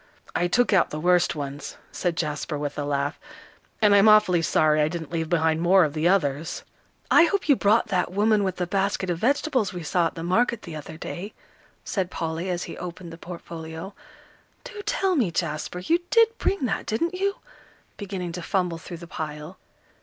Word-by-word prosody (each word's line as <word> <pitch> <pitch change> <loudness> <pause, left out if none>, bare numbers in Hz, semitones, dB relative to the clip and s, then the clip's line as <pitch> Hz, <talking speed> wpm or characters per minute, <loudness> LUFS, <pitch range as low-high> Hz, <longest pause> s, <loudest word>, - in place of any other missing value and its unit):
"I 175 - +1
took 245 +5 +2
out 190 - +4
the 150 - -5
worst 175 +1 +3
ones," 145 -1 -6
said 175 -3 -2
Jasper, 150 -1 -2
with 145 0 -4
a - - -1
laugh. 140 0 -1 0.6
"And 205 -1 +6
I'm 200 +2 +7
awfully 210 -5 +5
sorry 155 -1 +3
I 150 - +3
didn't 165 -1 -5
leave 165 -2 -2
behind 160 -2 +2
more 185 +2 +5
of 150 -3 -1
the 155 +2 +1
others." 160 -5 0 0.5
"I 340 - +8
hope 395 0 -1
you 285 - +6
brought 215 0 +2
that 180 -3 0
woman 210 +2 +3
with 190 -2 -2
a 180 - +1
basket 195 0 0
of 170 - -3
vegetables 260 - +1
we 175 -2 -6
saw 170 +2 +1
at - - -9
the 165 - -6
market 225 +6 +1
the 165 - -8
other 155 +1 -8
day," 185 +5 -7 0.5
said 190 -3 -1
Polly, 165 +1 -3
as 175 -1 -2
he - - -7
opened 175 -1 -7
the - - -9
portfolio. 165 +1 -8 0.7
"Do 460 -5 -8
tell 380 -1 +1
me, 240 - +2
Jasper, 165 0 -3
you 320 - +1
did 455 -1 +4
bring 390 -9 0
that, 195 -5 -2
didn't 335 +11 0
you?" 395 +2 0 0.6
beginning 190 -4 -5
to 180 +1 -6
fumble 175 -1 -1
through 170 +1 -8
the 170 - -10
pile. 155 +2 -6
175 Hz, 195 wpm, -25 LUFS, 160-205 Hz, 0.7 s, I